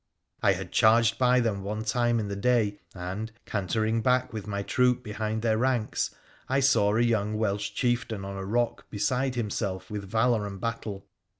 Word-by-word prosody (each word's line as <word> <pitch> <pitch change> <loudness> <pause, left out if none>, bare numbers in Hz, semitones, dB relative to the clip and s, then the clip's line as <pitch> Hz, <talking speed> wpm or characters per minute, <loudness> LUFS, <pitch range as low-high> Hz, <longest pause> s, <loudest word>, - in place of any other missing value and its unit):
I 100 - +4
had 95 -1 -6
charged 115 0 +4
by 125 0 +4
them 110 -4 -1
one 105 +2 -3
time 120 +1 +1
in 105 - -2
the 100 - -3
day, 105 -1 +1 0.2
and, 95 +5 -5
cantering 110 +3 0
back 125 +1 +1
with 105 -2 -5
my 100 -1 -2
troop 125 +2 +2
behind 110 0 -3
their 110 -1 +2
ranks, 125 -3 0 0.4
I 135 +1 +2
saw 120 -7 +3
a 115 - +3
young 110 -3 +1
Welsh 100 -2 -1
chieftain 120 -5 -1
on 100 0 -6
a 95 - -4
rock 120 +5 -1
beside 125 +5 0
himself 105 -5 -3
with 100 -2 -5
valour 110 -1 +2
and 100 -1 -7
battle. 110 -3 -4
110 Hz, 180 wpm, -27 LUFS, 100-120 Hz, 0.4 s, I